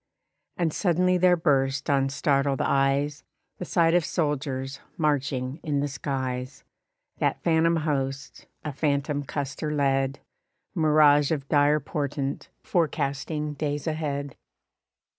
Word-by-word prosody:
And 165 -3 0
suddenly 180 0 +2
there 180 0 +5
burst 135 -4 +1
on 135 -2 +2
startled 140 -1 +1
eyes, 140 +2 +1 0.4
The 180 - -4
sight 165 -1 +3
of 175 -1 +4
soldiers, 140 -4 -2 0.2
marching 145 -3 -1
in 145 -2 -1
the 145 - 0
skies; 130 -1 -4 0.6
That - - +1
phantom 165 0 +3
host, 140 -3 -3 0.2
a 150 - -3
phantom 145 0 0
Custer 140 +2 -4
led; 135 -2 +1 0.5
Mirage 150 -4 +4
of 140 -3 -2
dire 145 0 +4
portent, 140 -2 -3
forecasting 150 -2 -1
days 145 0 -3
ahead. 145 -4 -3
145 Hz, 115 wpm, -26 LUFS, 135-155 Hz, 0.6 s, there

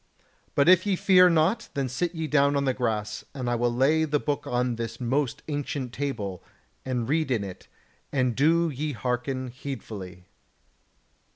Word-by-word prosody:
But 140 +2 +4
if 185 +2 +6
ye 200 - +2
fear 180 0 +6
not, 175 +8 +2
then 140 -2 0
sit 170 +8 -2
ye 160 -1 -2
down 140 -1 +3
on 140 0 +1
the 130 - +2
grass, 110 -4 -2
and 130 -3 -4
I 120 - +1
will 120 0 +1
lay 140 +6 +3
the 150 -1 +1
book 145 0 -2
on 125 0 0
this 115 -1 -5
most 130 +1 -1
ancient 145 -4 -3
table, 105 -10 -3 0.4
and 125 -3 -2
read 155 +1 +1
in 115 -5 +1
it, 95 -2 -9 0.4
and 130 -4 +1
do 165 +3 +3
ye 145 +2 -3
hearken 125 +3 -2
heedfully." 105 -9 -7
135 Hz, 170 wpm, -26 LUFS, 120-150 Hz, 0.4 s, if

